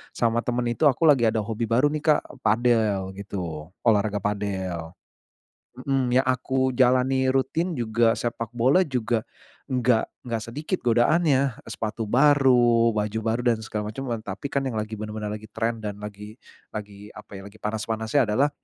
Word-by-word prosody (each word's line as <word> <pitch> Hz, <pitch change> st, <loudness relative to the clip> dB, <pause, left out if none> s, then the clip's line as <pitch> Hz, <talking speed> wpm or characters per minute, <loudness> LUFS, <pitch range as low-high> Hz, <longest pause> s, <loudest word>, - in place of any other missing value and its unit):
sama 115 Hz, 0 st, +1 dB
teman 120 Hz, 0 st, -1 dB
itu, 150 Hz, +5 st, +3 dB
aku 140 Hz, +4 st, +1 dB
lagi 120 Hz, -5 st, +5 dB
ada 110 Hz, -1 st, 0 dB
hobi 115 Hz, +1 st, -3 dB
baru 130 Hz, +6 st, +3 dB
nih, 155 Hz, -, -2 dB, 0.2 s
Kak, -, -, -1 dB, 0.2 s
padel, 110 Hz, -4 st, +2 dB
gitu, 85 Hz, -5 st, -6 dB
olahraga 105 Hz, -3 st, +2 dB
padel 95 Hz, -5 st, -3 dB, 0.9 s
mhm, 135 Hz, -2 st, 0 dB
yang 130 Hz, +2 st, +3 dB
aku 130 Hz, 0 st, 0 dB
jalani 130 Hz, +1 st, +3 dB
rutin, 155 Hz, +7 st, 0 dB
juga, 115 Hz, 0 st, +2 dB
sepak 115 Hz, -1 st, -3 dB
bola 130 Hz, +10 st, +3 dB
juga, 120 Hz, -7 st, -1 dB, 0.5 s
nggak 125 Hz, -3 st, +2 dB, 0.2 s
nggak 115 Hz, -3 st, -2 dB
sedikit 155 Hz, +8 st, -3 dB
godaannya, 135 Hz, +3 st, +3 dB, 0.2 s
sepatu 110 Hz, +1 st, -4 dB
baru, 125 Hz, -4 st, +4 dB
baju 105 Hz, +1 st, -1 dB
baru, 115 Hz, +2 st, -1 dB
dan 115 Hz, -, -3 dB
segala 105 Hz, -1 st, -4 dB
macam. 135 Hz, 0 st, -5 dB
Tapi 105 Hz, +4 st, -6 dB
kan, 140 Hz, -1 st, 0 dB
yang, 130 Hz, -, -2 dB
lagi 110 Hz, 0 st, -3 dB
benar-benar 105 Hz, 0 st, -5 dB
lagi 105 Hz, 0 st, -6 dB
trend, 115 Hz, 0 st, -3 dB
dan, 105 Hz, 0 st, -5 dB
lagi 105 Hz, +1 st, -8 dB, 0.4 s
lagi, 105 Hz, -1 st, -8 dB
apa 105 Hz, -, -13 dB
ya, -, -, -9 dB
lagi 105 Hz, +2 st, -16 dB
panas-panasnya 110 Hz, +3 st, 0 dB
adalah 135 Hz, +8 st, +2 dB
115 Hz, 160 wpm, -25 LUFS, 105-130 Hz, 0.9 s, lagi